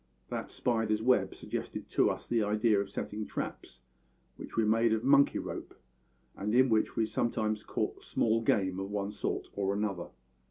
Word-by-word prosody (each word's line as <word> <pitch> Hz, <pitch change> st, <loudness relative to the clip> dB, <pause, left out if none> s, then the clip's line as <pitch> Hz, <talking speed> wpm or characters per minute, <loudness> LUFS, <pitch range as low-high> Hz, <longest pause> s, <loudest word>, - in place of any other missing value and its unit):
That -, -, -4 dB
spider's 110 Hz, -3 st, 0 dB
web 125 Hz, +1 st, +3 dB
suggested -, -, -5 dB
to -, -, +3 dB
us -, -, -4 dB
the 115 Hz, -1 st, +2 dB
idea 105 Hz, 0 st, +2 dB
of 100 Hz, -, -5 dB
setting 105 Hz, +1 st, -4 dB
traps, 65 Hz, -, -6 dB, 0.5 s
which -, -, -9 dB
we 115 Hz, -, +3 dB
made 115 Hz, +1 st, +3 dB
of 110 Hz, 0 st, 0 dB
monkey 140 Hz, +1 st, +5 dB
rope, -, -, -6 dB, 0.6 s
and 105 Hz, +3 st, -1 dB
in 130 Hz, +1 st, +5 dB
which 110 Hz, -1 st, +2 dB
we 115 Hz, -, +2 dB
sometimes 110 Hz, -1 st, -1 dB
caught -, -, -3 dB
small 115 Hz, 0 st, +1 dB
game 95 Hz, -4 st, +1 dB
of 95 Hz, 0 st, -4 dB
one 100 Hz, 0 st, -2 dB
sort 105 Hz, -, -3 dB
or 100 Hz, 0 st, 0 dB
another. 100 Hz, -4 st, -2 dB
110 Hz, 170 wpm, -31 LUFS, 100-115 Hz, 0.6 s, monkey